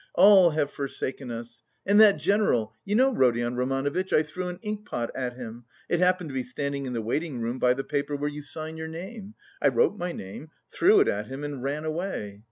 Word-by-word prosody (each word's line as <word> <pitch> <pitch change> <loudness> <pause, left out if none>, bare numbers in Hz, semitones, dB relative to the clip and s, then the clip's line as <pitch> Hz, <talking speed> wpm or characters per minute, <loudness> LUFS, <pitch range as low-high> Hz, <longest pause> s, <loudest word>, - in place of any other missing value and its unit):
All 195 -3 +8
have 150 -2 -1
forsaken 135 -1 -4
us!... 115 0 -7 0.2
And 205 +2 +4
that 210 -2 +7
general.... 125 - +1
You 205 - -1
know, 260 +3 +4
Rodion 120 - +2
Romanovitch, 135 +8 -1
I 155 - +4
threw 180 +4 -5
an 180 0 -5
inkpot 210 - -3
at 125 -2 -3
him 120 -1 -9 0.2
it 175 - +1
happened 180 -3 +2
to - - -9
be 130 - -1
standing 140 +2 -4
in 125 - -4
the 115 -2 -2
waiting 145 +3 -2
room 120 +2 -3
by 125 0 +3
the 135 - -3
paper 145 0 -2
where 145 +1 -2
you 150 0 -5
sign 155 +2 -5
your 160 0 -5
name. 195 +6 -8 0.3
I - - +4
wrote 470 -2 +3
my 175 0 -2
name, 100 - -8 0.2
threw 405 +3 +5
it 405 - +3
at - - -1
him 135 +2 -7
and 145 -3 -5
ran 145 +4 -3
away. 155 - -4
145 Hz, 215 wpm, -26 LUFS, 125-180 Hz, 0.3 s, All